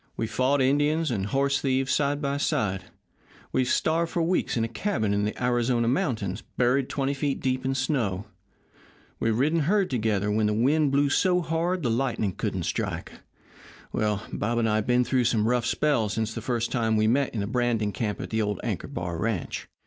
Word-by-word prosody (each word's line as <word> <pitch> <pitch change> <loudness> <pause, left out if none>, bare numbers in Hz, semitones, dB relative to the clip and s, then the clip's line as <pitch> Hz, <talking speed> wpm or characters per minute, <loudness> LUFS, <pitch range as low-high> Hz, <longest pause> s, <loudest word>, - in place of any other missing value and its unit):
We've 115 - -2
fought 135 +2 +2
Indians 145 +3 +2
and 100 -4 -1
horse 140 +4 +1
thieves 135 0 +1
side 145 +1 0
by 140 0 0
side; 95 -9 -1 0.7
we've 130 -1 +1
starved 165 +5 +1
for 170 - +1
weeks 175 -6 0
in 115 - +1
a - - 0
cabin 115 - -1
in 100 0 +1
the 105 +4 -4
Arizona 120 -1 +1
mountains, 115 - -1 0.2
buried 130 +2 +2
twenty 140 0 -1
feet 140 0 -1
deep 130 0 -1
in 135 0 0
snow; 120 - -1 0.9
we've 115 -1 +1
ridden 155 +6 +2
herd 190 +4 +1
together 105 -4 0
when 105 0 +2
the 105 - 0
wind 140 +5 +2
blew 140 +1 +3
so 180 +3 +3
hard 170 +2 -1
the 120 - +1
lightning 115 -5 0
couldn't - - -3
strike - - -3 0.8
well, 105 -1 0
Bob 115 +3 -1
and 115 -1 +2
I 110 -1 +2
have 110 - -2
been 125 0 +4
through 125 0 +1
some 110 -2 +2
rough 120 -1 +1
spells 120 -10 +1
since 110 0 -2
the 115 - -5
first 120 0 -1
time 115 -3 +1
we 110 - +3
met 130 +3 +1
in 105 - -1
the - - -1
branding 115 -2 0
camp 105 -1 -3
of - - -5
the 110 0 0
old 105 -2 -1
Anchor - - -3
Bar 85 -1 -4
ranch. 110 -5 -3
125 Hz, 200 wpm, -26 LUFS, 110-140 Hz, 0.9 s, been